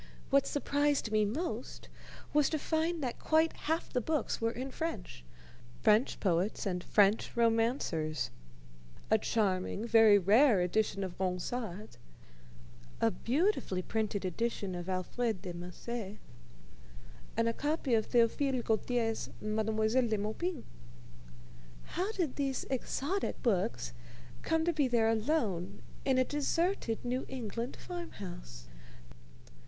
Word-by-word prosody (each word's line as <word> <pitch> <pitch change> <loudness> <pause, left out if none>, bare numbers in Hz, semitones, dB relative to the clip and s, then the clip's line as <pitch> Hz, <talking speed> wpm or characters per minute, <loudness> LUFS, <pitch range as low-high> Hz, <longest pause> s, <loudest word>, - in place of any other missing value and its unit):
What 275 0 +4
surprised 285 -4 +1
me 215 -1 +3
most 240 - -4 0.5
was 295 -2 +4
to 315 - 0
find 320 +1 0
that 245 -2 -3
quite 320 +1 +3
half 320 +2 -2
the 250 - +1
books 305 0 -1
were 230 - +2
in 255 +3 -5
French 225 - -5 0.6
French 215 +4 +4
poets 185 +3 0
and 180 -2 -1
French 205 +3 +3
romancers: 225 - +1 0.8
a 220 - +5
charming, 205 -1 0
very 225 -2 +7
rare 210 +4 +5
edition 195 +2 +1
of 185 -2 -6
Ronsard, 190 - -3 1.0
a 225 - +3
beautifully 255 - 0
printed 210 -2 -1
edition 200 +1 -2
of 175 +1 -5
Alfred 190 +3 -1
de 180 -3 -5
Musset, 195 +5 -6 1.2
and 230 0 +3
a 230 - +1
copy 290 -1 -1
of 220 -1 +2
Théophile 245 +2 +2
Gautier's 225 0 0
Mademoiselle 220 +3 +1
de 220 -1 0
Maupin. 240 - -3 1.2
How 370 +5 -2
did 345 -10 -2
these 275 -2 -1
exotic 285 +8 -2
books 215 -2 0 0.5
come 320 0 +1
to 345 - +2
be 295 -4 +2
there 230 -2 +3
alone 220 - 0 0.2
in 265 -2 +3
a 255 - +5
deserted 295 - 0
New 250 +2 -1
England 235 -1 -4
farm 350 -2 -7
house? - - -8
230 Hz, 125 wpm, -32 LUFS, 205-275 Hz, 1.2 s, very